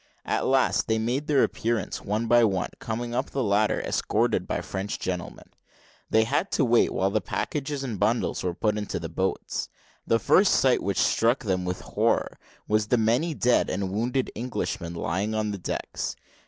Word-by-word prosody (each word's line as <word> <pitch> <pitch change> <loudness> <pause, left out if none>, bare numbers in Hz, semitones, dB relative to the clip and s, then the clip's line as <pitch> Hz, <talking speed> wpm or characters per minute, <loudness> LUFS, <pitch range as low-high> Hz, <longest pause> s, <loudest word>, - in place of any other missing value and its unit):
At - - 0
last 135 0 +2
they 110 - +2
made 120 +6 -1
their 145 -3 +4
appearance, 115 -4 -1
one 105 +3 -1
by 120 +1 +5
one 95 -4 +1
coming 120 +1 -4
up - - -1
the 135 - -1
ladder, 105 0 +2
escorted - - 0
by - - -1
French 95 +1 -4
gentlemen. 90 -2 -5 0.6
They 110 - +4
had 165 - 0
to 140 - +3
wait 120 0 +4
while 95 +1 0
the 110 +1 +1
packages 140 - -3
and 115 -7 -4
bundles 110 +2 0
were 90 -2 -2
put 105 +1 0
into 105 - -3
the 80 - -5
boats. 95 +4 -2 0.4
The 115 - +4
first 185 - +4
sight 130 -2 +3
which 100 -1 -2
struck 115 +4 +2
them 95 -4 -1
with 90 0 -3
horror - - 0 0.3
was 105 0 +1
the 125 - +3
many 120 +9 +1
dead 125 -2 +2
and 95 0 -2
wounded 120 +6 -1
Englishmen 95 -7 -3
lying 95 +6 -1
on 105 -1 0
the 100 - -5
decks. - - -4
110 Hz, 180 wpm, -26 LUFS, 95-120 Hz, 0.6 s, by